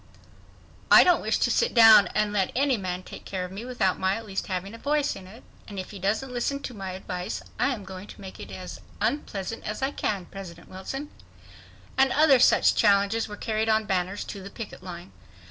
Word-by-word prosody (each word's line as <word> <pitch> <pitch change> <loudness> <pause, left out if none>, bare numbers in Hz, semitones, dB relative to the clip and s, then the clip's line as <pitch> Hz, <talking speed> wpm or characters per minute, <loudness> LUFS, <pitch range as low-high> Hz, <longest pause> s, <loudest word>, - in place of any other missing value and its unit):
"I - - +9
don't 355 - +4
wish - - +1
to - - +1
sit 475 - +1
down 220 -4 +9
and 210 -1 +1
let 195 -2 +1
any 270 0 +3
man 185 -3 -4
take - - -10
care 185 -2 -4
of 180 - -9
me 200 +5 -7
without 245 -7 0
my 190 +1 +1
at 225 +1 -6
least 195 -2 -4
having 190 +2 -4
a 230 - -10
voice 295 +1 0
in 190 -1 -10
it, 215 +5 -14 0.2
and 205 - -9
if 185 - -5
he 200 - -9
doesn't 220 +7 -1
listen 265 +3 -1
to 250 - -5
my 195 -3 -6
advice, 180 -1 -5 0.2
I - - +3
am 245 -7 -2
going 190 +1 -9
to - - -12
make 190 -1 -10
it - - -8
as - - -8 0.2
unpleasant 225 -7 -2
as 210 +5 -4
I 270 - +1
can."—President 195 -6 -5
Wilson,—and 270 +4 -5
other 290 -3 +6
challenges 205 -1 +4
were 210 -1 -8
carried 220 +1 -1
on 220 0 +3
banners 190 0 -1
to 200 - -8
the 195 - -8
picket 215 -2 -8
line. 180 0 -9
205 Hz, 205 wpm, -26 LUFS, 190-240 Hz, 0.2 s, I